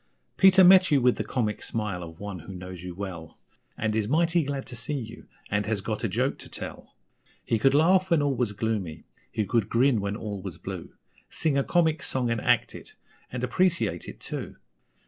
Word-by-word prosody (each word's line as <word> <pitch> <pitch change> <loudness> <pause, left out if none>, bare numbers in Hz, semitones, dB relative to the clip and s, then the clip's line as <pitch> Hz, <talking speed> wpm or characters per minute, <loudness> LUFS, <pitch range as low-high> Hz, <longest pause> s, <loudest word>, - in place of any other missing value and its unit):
Peter 190 0 +7
met 185 0 +8
you 145 - +4
with 125 -1 +3
the - - -1
comic 110 -4 -2
smile 105 -5 -3
of 80 -1 -9
one 100 -3 -6
who 95 +4 -9
knows 90 -1 -8
you 90 -1 -7
well, 90 -5 -7 0.4
And 110 0 -1
is 110 -2 0
mighty 165 +4 +2
glad 140 -1 -4
to 125 - -8
see 125 +5 -2
you, 115 -1 -9 0.2
and 105 0 0
has 110 -2 0
got 110 +3 -4
a 115 - +1
joke 125 +8 0
to - - -9
tell; - - -8 0.5
He 115 - +1
could 135 +4 +4
laugh 185 +5 +4
when 170 - +4
all 140 -1 +1
was 120 -5 -1
gloomy, 100 -7 -3 0.3
he 110 - -1
could 110 +1 0
grin 120 -2 +3
when 100 +1 -2
all 105 -3 -5
was 95 -4 -7
blue, - - -7 0.3
Sing 155 -3 0
a 140 - +2
comic 160 -2 +2
song 125 -4 -1
and 115 -2 -1
act - - +2
it, - - -11 0.4
and 125 0 -4
appreciate 140 - 0
it, - - -9
too. - - -6
115 Hz, 205 wpm, -27 LUFS, 100-140 Hz, 0.5 s, met